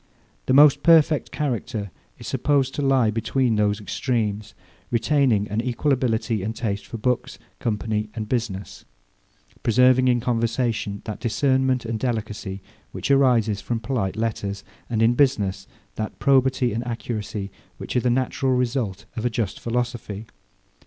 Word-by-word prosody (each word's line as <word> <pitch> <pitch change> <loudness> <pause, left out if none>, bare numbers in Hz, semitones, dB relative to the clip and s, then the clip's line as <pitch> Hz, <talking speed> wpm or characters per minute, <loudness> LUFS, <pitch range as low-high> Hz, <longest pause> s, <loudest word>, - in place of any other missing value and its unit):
The 130 - +3
most 145 +1 +7
perfect 160 -3 +4
character 115 -8 -3 0.3
is - - -11
supposed 140 -2 +1
to - - -3
lie 135 -5 +3
between 115 +2 0
those 105 0 +1
extremes; 105 -2 -2 0.3
retaining 120 -3 +2
an 105 +2 0
equal 125 +4 -1
ability 115 -4 0
and 110 +4 -3
taste 100 -3 -3
for 115 - -6
books, 125 +2 -1 0.2
company, 110 -1 -2
and 110 -2 -4
business; 110 -5 -3 0.8
preserving 125 +2 +4
in 120 -1 +3
conversation 115 -3 -1
that 105 - -5
discernment 130 +1 +1
and 115 -1 -3
delicacy 105 -5 -3 0.3
which - - -3
arise 120 -7 +3
from 120 -1 -2
polite 115 -5 -2
letters; 100 -3 -3 0.3
and 115 -2 +1
in 115 +2 +5
business, 105 -8 +1 0.3
that 110 -1 -4
probity 130 -3 +3
and 115 +2 -2
accuracy 105 -4 -4 0.3
which - - -6
are - - +4
the 125 - +1
natural 130 +2 +1
result 120 -5 -1
of 110 - -4
a 125 - +2
just 110 -4 -2
philosophy. 115 -3 -3
115 Hz, 145 wpm, -23 LUFS, 105-130 Hz, 0.8 s, most